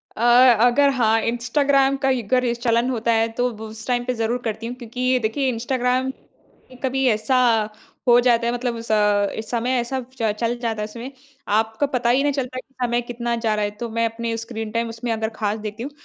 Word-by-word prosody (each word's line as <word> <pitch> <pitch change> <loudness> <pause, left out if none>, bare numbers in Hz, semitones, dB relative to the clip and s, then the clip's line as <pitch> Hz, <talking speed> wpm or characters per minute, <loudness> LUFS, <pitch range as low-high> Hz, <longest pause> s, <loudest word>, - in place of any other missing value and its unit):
अ, 220 - -6 0.4
अगर 280 +3 +4
हाँ 225 -2 +3
इंस्टाग्राम 275 +4 +2
कई 260 -2 +2
का 200 - -14
अगर 245 -2 +1
चलन 235 +1 +1
होता 235 -2 0
है 225 0 +2
तो 250 0 +2 0.2
उस 220 0 -10
टाइम 245 -1 +1
पे 250 - -1
ज़रूर 230 +1 -1
करती 225 +1 -3
हूँ 245 - -5
क्योंकि 250 +1 -1
देखिए 245 +5 -1
इंस्टाग्राम 250 +2 0 0.7
कभी 265 0 0
ऐसा 220 +4 +1 0.7
हो 240 0 +7
जाता 235 -1 +3
है 235 - 0
मतलब 245 -1 -2
अ, 210 -2 +1
समय 240 +2 -2
ऐसा 260 +2 -2 0.2
च 220 -2 +2
चल 240 +1 0
जाता 225 -2 -2
है - - -1
इसमें 235 +5 -8 0.5
आपको 220 +6 0
पता 245 -3 0
ही 260 +3 +4
नहीं 290 -1 +1
चलता 255 -2 -3
कि 265 - -16
समय 240 0 0
कितना 240 0 -3
जा 225 -2 0
रहा 210 -1 0
है 205 - -3
तो 235 -1 -4
मैं 230 +1 0
अपने 230 0 -4
स्क्रीन 225 -1 -6
टाइम 230 0 -1
उसमें 230 +1 -4
अगर 220 0 -1
खास 210 0 -2
देखती 215 +2 -6
हूँ 285 - -6
235 Hz, 205 wpm, -22 LUFS, 225-250 Hz, 0.7 s, हो